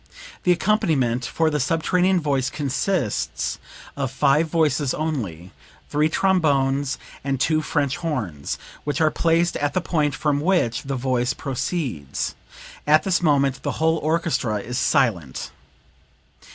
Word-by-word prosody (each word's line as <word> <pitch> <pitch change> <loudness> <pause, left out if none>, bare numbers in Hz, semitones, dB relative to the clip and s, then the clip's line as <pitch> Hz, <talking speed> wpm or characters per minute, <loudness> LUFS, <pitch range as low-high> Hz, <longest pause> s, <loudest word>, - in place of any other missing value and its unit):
The 180 - +5
accompaniment 150 - +1
for 160 +7 +1
the 150 - 0
subterranean 180 +6 +2
voice 140 -5 0
consists 145 +4 -1 0.4
of 135 -2 -2
five 140 +4 +2
voices 150 -4 +1
only 105 - -3 0.4
three 150 +2 +2
trombones 145 -7 +2 0.3
and 135 -1 -1
two 155 +3 +2
French 145 -2 -1
horns, 125 - -3 0.3
which 145 +1 -2
are 155 -1 +3
placed 170 +1 +2
at 145 +3 -1
the - - +3
point 150 -5 0
from 145 -2 0
which 165 -9 +1
the 135 -1 -4
voice 125 -1 0
proceeds. 130 - -3 0.5
At 155 +1 +5
this 185 -2 +1
moment 140 -4 +2
the - - -2
whole 160 +1 +2
orchestra 155 -7 0
is 125 +5 -4
silent." 100 - 0
145 Hz, 130 wpm, -23 LUFS, 130-165 Hz, 0.5 s, The